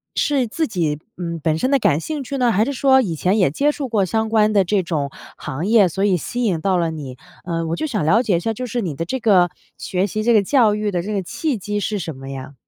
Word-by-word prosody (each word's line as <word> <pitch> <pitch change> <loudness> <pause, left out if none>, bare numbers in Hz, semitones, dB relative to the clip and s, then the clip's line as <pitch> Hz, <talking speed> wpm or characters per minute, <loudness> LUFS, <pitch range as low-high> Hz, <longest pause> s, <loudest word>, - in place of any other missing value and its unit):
是 275 -4 +1
自 315 +8 -1
己， 160 -8 -1 0.2
嗯， 170 -2 -4
本 160 -1 +1
身 255 - 0
的 275 - +4
感 150 -7 +2
兴 295 - -4
趣 275 +2 -4
呢？ 245 -2 +2
还 215 +3 +2
是 280 - -2
说 265 0 +4
以 175 -8 -2
前 185 +7 +1
也 180 -9 +3
接 290 - +2
触 280 -3 -5
过 205 -4 +2
相 220 +3 -1
关 215 -1 +3
的 200 -2 +4
这 195 +2 +1
种 145 -5 -2 0.3
行 150 +5 -5
业， 215 -4 +5
所 195 +4 -2
以 185 -3 +3
吸 245 +9 -3
引 175 -8 0
到 190 -2 +1
了 170 -1 0
你？ 140 -5 -7 0.3
嗯， 165 -1 -2
我 165 - -1
就 310 - -3
想 210 - -2
了 215 +9 +4
解 185 -7 +2
一 - - -1
下， 225 +5 -2
就 250 +3 -5
是 240 0 -2
你 165 -8 -3
的 165 - -3
这 260 +8 -3
个 190 -6 +4 0.3
学 190 +2 -1
习 215 +3 -3
这 235 0 +3
个 215 - +5
教 225 -2 +3
育 210 -1 -1
的 175 -2 -1
这 210 +4 -4
个 195 - 0
契 285 - -2
机 205 +2 -3
是 205 0 -2
什 160 -4 -5
么 135 +1 -9
呀？ 135 +1 -7
200 Hz, 300 characters per minute, -20 LUFS, 170-230 Hz, 0.3 s, 业